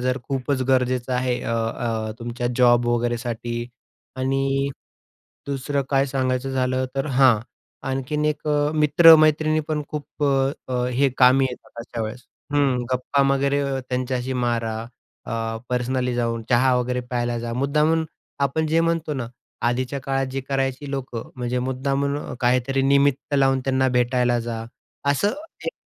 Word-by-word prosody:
जर 125 +1 0
खूपच 135 0 -1
गरजेचं 125 -1 +1
आहे 125 0 0
अ, 115 - -2
अ, 115 -1 -2
तुमच्या 120 +1 -4
जॉब 120 -1 +5
वगैरेसाठी 120 0 -2 0.5
आणि 135 +1 0 0.8
दुसरं 140 +1 -1
काय 135 0 +3
सांगायचं 130 0 -1
झालं, 130 0 0
तर 135 - 0
हां, 130 -4 +5 0.5
आणखीन 135 +3 -2
एक 150 0 -1 0.3
मित्र-मैत्रिणी 155 0 +6
पण 150 -1 -1
खूप 150 0 -7
अ, 135 -1 +2 0.2
अ, 125 -1 0
हे 135 +2 +3
कामी 130 +1 +6
येतात 120 -1 -10
अशा 115 -1 -5
वेळेस. 110 +3 -6 0.3
हं. 135 -4 +2
गप्पा 140 +2 +1
वगैरे 140 +1 +1 0.3
त्यांच्याशी 130 0 -2
मारा 115 -2 -1 0.5
अ, 115 -1 -2
पर्सनली 125 0 -1
जाऊन. 115 -1 -1
चहा 125 +1 +4
वगैरे 125 0 -1
प्यायला 120 -1 -2
जा. 115 0 -4
मुद्दामून 150 +5 +2 0.4
आपण 150 +3 +1
जे 165 +2 +2
म्हणतो 165 -2 0
ना, 130 -3 -3 0.4
आधीच्या 130 +3 -2
काळात 135 0 -1
जी 135 - -2
करायची 135 +1 -1
लोकं 125 -4 -5
म्हणजे 125 0 -2
मुद्दामून 135 +2 -1 0.2
काहीतरी 130 +2 +2
निमित्त 140 +1 +2
लावून 135 -1 +3
त्यांना 130 -1 +2
भेटायला 125 0 +2
जा. 115 -1 -4 0.5
असं 200 +9 +2 0.3
एक - - -2
130 Hz, 140 wpm, -23 LUFS, 120-140 Hz, 0.8 s, मित्र-मैत्रिणी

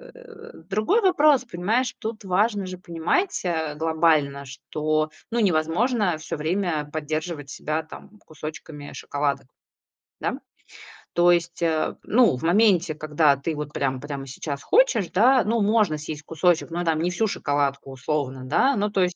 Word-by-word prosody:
э 460 -2 -13 0.2
Другой 215 - +2
вопрос. 305 -8 +4
Понимаешь, 225 +6 -1
тут 220 -1 -5
важно 200 +2 +1
же 185 0 -6
понимать, 175 - -1
а, 160 -3 -1
глобально, 155 -3 +1
что, 155 +3 -2 0.2
ну, 235 - 0
невозможно 185 +2 +1
всё 155 +1 -5
время 160 -2 -1
поддерживать 155 -1 -4
себя, 155 +2 -3
там, 210 +6 -13
кусочками 155 -1 -8
шоколадок. 140 -2 -2 0.7
Да? - - -2 0.7
То 175 +1 +5
есть, 170 0 -2
а, 160 -2 0
ну, 230 - +3
в - - -10
моменте, 175 -3 +3
когда 150 -1 +2
ты 155 +3 -3
вот 150 0 -6
прям 135 -2 -1
прямо 140 -2 -6
сейчас 140 +1 -6
хочешь, 330 - +3
да, 250 +7 +5
ну 225 +1 0
можно 210 -6 +2
съесть 150 0 -7
кусочек, 165 +1 +1
но 175 +1 -2
там 160 -1 +1
не 175 - +1
всю 220 +5 0
шоколадку, 140 -5 -1
условно, 135 -1 -3
да. 260 - +2
Ну 205 +1 +1
то 195 -2 0
есть 180 0 -1
165 Hz, 155 wpm, -24 LUFS, 150-210 Hz, 0.7 s, То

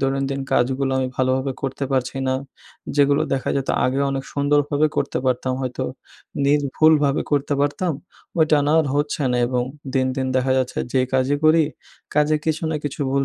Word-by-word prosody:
দৈনন্দিন 135 0 -1
কাজগুলো 135 +2 +1
আমি 130 -1 0
ভালোভাবে 130 +1 +1
করতে 135 +1 -2
পারছি 130 0 -1
না। 130 - +1 0.6
যেগুলো 140 0 +4
দেখা 135 -1 -1
যেত 135 - -2 0.2
আগে 130 +2 +1
অনেক 135 0 -3
সুন্দরভাবে 145 +1 +2
করতে - - 0
পারতাম 130 0 0
হয়তো, 125 -1 -3 0.6
নির্ভুলভাবে 145 0 +3
করতে 145 0 +1
পারতাম, 155 +4 0 0.5
ওইটা 155 -2 +4
না 150 - +2
আর 155 - -1
হচ্ছে 145 +1 -1
না। 125 - +1
এবং 125 0 0 0.3
দিন, 130 -1 +2
দিন 130 -1 -1
দেখা 130 0 +2
যাচ্ছে 130 -1 -2
যে 130 - +3
কাজই 130 +2 +2
করি, 155 +1 +5 0.5
কাজে 150 +1 +3
কিছু 160 0 -1
না 160 - -1
কিছু 145 +1 -4
ভুল 140 0 +1
140 Hz, 170 wpm, -22 LUFS, 130-145 Hz, 0.6 s, করি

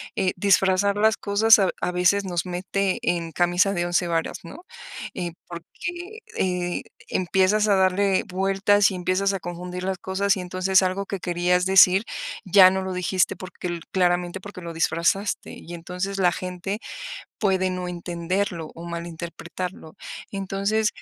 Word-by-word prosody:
eh, 185 - +1
disfrazar 195 +1 +3
las 220 +1 +4
cosas 215 +2 +5
a 195 - +4
v - - 0
a - - 0
veces 185 +3 +2
nos 175 -2 -2
mete 185 +2 -1
en 170 -2 -1
camisa 175 +4 +2
de 175 -1 -1
11 175 0 +1
varas, 165 -1 -1
¿no?, 320 - -11 0.5
eh, 175 -2 -3 0.2
porque, 345 - -7 0.2
eh, 180 -1 -1 0.3
empiezas 190 +4 +2
a 200 - +5
darle 190 +1 +2
vueltas 195 +2 +2
y 190 - -4
empiezas 185 +2 +1
a 195 - -2
confundir 180 +1 -6
las 190 -1 -2
cosas, 195 +2 +1
y - - -3
entonces 185 +1 +2
algo 190 +2 -1
que 195 - -4
querías 180 0 +1
decir, 190 +1 +6 0.4
ya 185 0 +8
no 190 0 -1
lo 190 - -4
dijiste 180 0 +1
porque 185 0 -7
l 175 -1 -3
claramente 175 0 +1
porque 195 -2 -9
lo 170 -1 -6
disfrazaste, 170 +4 0
y 175 - -10
entonces 180 +3 -4
la 180 -2 +4
gente 185 +3 -4 0.6
puede 190 -3 +1
no 180 0 -4
entenderlo 175 0 -3
o 170 - -9
malinterpretarlo. 170 +1 -6 0.4
Entonces, 200 +3 0
185 Hz, 155 wpm, -24 LUFS, 175-195 Hz, 0.6 s, ya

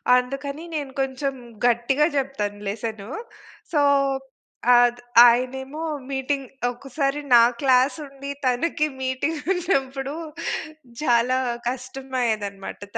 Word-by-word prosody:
అందుకని 275 +4 -2
నేను 285 -3 -3
కొంచెం 270 +1 -2 0.3
గట్టిగా 245 +5 +3
చెప్తాను 210 -7 -2
లెసను. 215 0 -4 0.6
సో, 305 - +2 1.0
ఆద్ 245 0 +4 0.3
ఆయనేమో 265 +5 0 0.3
మీటింగ్ 270 0 -1 0.2
ఒక్కసారి 275 +3 -2 0.2
నా 235 - +9 0.2
క్లాస్ 260 +1 +4
ఉండి 275 0 -9 0.2
తనకి 300 +5 +1
మీటింగ్ 260 +5 -1
ఉన్నప్పుడు 275 -6 -1 0.9
చాలా 245 -1 +3 0.3
కష్టం 260 +1 -7
అయ్యేదన్నమాట! 205 -4 -2 0.2
త - - +1
265 Hz, 95 wpm, -24 LUFS, 245-275 Hz, 1.0 s, నా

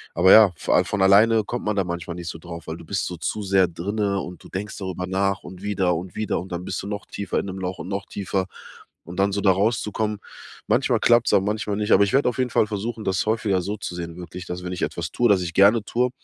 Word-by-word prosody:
Aber 90 +3 +5
ja, 110 -4 +8
vo - - -1
a 90 - +5
von 100 0 -2
alleine 105 +3 +5
kommt 120 +3 -4
man 105 -1 0
da 95 - +3
manchmal 85 0 -5
nicht 85 - -7
so 80 - -6
drauf, 85 -1 -9
weil 80 - -4
du - - -12
bist 100 - -2
so 90 - -4
zu 105 +6 -3
sehr 95 -2 +3
drinne 100 +4 -2
und 90 0 -9
denkst 100 +2 -4
darüber 90 -2 -4
nach 95 +1 0
und 95 0 -10
wieder 95 -3 +1
und 90 +2 -6
wieder 110 -2 -1
und 95 - -11
dann 90 +1 -4
bist 95 - -4
du - - -6
noch 100 -1 -5
tiefer 100 -2 -3
in - - -4
'nem 95 0 -6
Loch 90 0 -4
und 85 - -6
noch 100 0 -3
tiefer. 95 -1 -2 0.6
Und 90 +2 -8
dann 100 +1 +3
so 100 - -1
da 95 - +5
rauszukommen, 105 +1 0 0.5
manchmal - - +2
klappt's 120 0 +4
aber 95 - +4
manchmal 105 0 -1
nicht. 105 +1 -1
Aber - - +7
ich 100 - 0
werde 135 0 +3
auf 120 - -5
jeden 125 -1 +1
Fall - - +3
versuchen, 110 +2 -4
das 95 -2 0
häufiger 105 -4 +1
so 100 +4 -4
zu 95 - -6
sehen 85 -1 -6
wirklich, 90 +1 -8
dass 90 0 -5
wenn 90 - -4
ich 90 - -6
etwas 85 -2 -3
tue, 120 -2 +2
das 95 -2 +4
ich 85 - -5
gerne 100 +4 +5
tue, 125 +3 0
95 Hz, 265 wpm, -23 LUFS, 90-105 Hz, 0.6 s, ja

